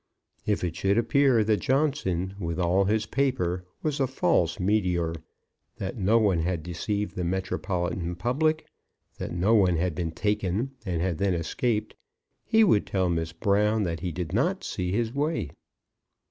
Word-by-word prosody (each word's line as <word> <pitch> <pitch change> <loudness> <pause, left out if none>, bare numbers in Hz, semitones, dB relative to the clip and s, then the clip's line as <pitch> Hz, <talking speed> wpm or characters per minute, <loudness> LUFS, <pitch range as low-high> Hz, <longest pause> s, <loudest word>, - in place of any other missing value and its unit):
If 105 -3 +1
it 85 -2 -2
should 100 +2 +1
appear 125 -1 +4
that 105 0 +2
Johnson, 130 - 0
with 85 -3 -3
all 90 +3 +3
his 105 +2 +1
paper, 105 -10 -1 0.2
was 150 -1 -1
a 135 - +2
false 130 - +1
meteor; 90 -4 +1 0.6
that 95 - -4
no 110 +1 +3
one 100 -6 +3
had 85 -1 -1
deceived 100 +5 -3
the 90 - -2
metropolitan 90 -1 -2
public; 155 - 0 0.5
that - - -4
no 90 +6 +2
one 95 -5 +4
had 90 +1 0
been 85 +1 -2
taken 105 +5 -1 0.2
and 85 -2 -1
had 90 -3 -1
then 100 -2 +1
escaped, 105 +6 -1 0.5
he 225 0 +4
would 110 - +3
tell 95 -2 +1
Miss 80 -1 -1
Brown 105 +5 +2
that 85 -3 -2
he 90 +2 -3
did 85 -1 -4
not - - +1
see 90 0 -3
his 115 +3 0
way. 145 - -1
95 Hz, 160 wpm, -27 LUFS, 90-115 Hz, 0.6 s, appear